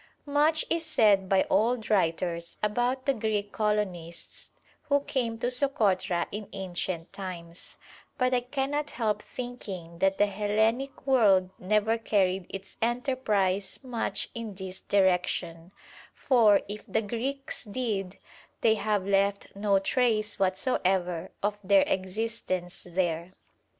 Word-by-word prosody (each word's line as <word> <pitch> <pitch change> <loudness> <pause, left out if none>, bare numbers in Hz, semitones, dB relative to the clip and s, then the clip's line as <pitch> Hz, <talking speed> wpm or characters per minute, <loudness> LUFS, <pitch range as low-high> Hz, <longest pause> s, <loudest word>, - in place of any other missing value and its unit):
Much 300 +2 +2
is 335 0 +1
said 210 - +3
by 195 -1 +4
old 230 0 +1
writers 170 -3 0
about 245 +5 0
the 275 - +3
Greek 215 -3 -1
colonists 190 -6 -3 0.4
who 285 0 +4
came 255 -6 -2
to 245 +2 -1
Sokotra 205 -9 +2
in 210 0 -6
ancient 180 -3 -4
times, 175 -3 -8 0.4
but 255 -2 +2
I 250 - +4
cannot 275 +4 -2
help 220 -3 -1
thinking 195 -9 -7
that 195 +1 +2
the 205 - +5
Hellenic 220 +7 0
world 200 -9 +4
never 215 +4 +1
carried 190 -4 +1
its 195 -1 -8
enterprise 220 -6 0
much 245 -3 -2
in 230 -4 -6
this 190 -1 -7
direction, 180 -3 +1 0.4
for, 225 -6 +4
if 210 +1 -6
the 220 - 0
Greeks 265 +6 -4
did, 205 -4 -3 0.4
they 220 - +5
have 210 -3 0
left 200 0 +1
no 200 0 +2
trace 215 0 +1
whatsoever 185 -3 0
of 205 0 0
their 195 0 +5
existence 185 -2 -3
there. 175 0 -1
205 Hz, 125 wpm, -28 LUFS, 185-240 Hz, 0.4 s, the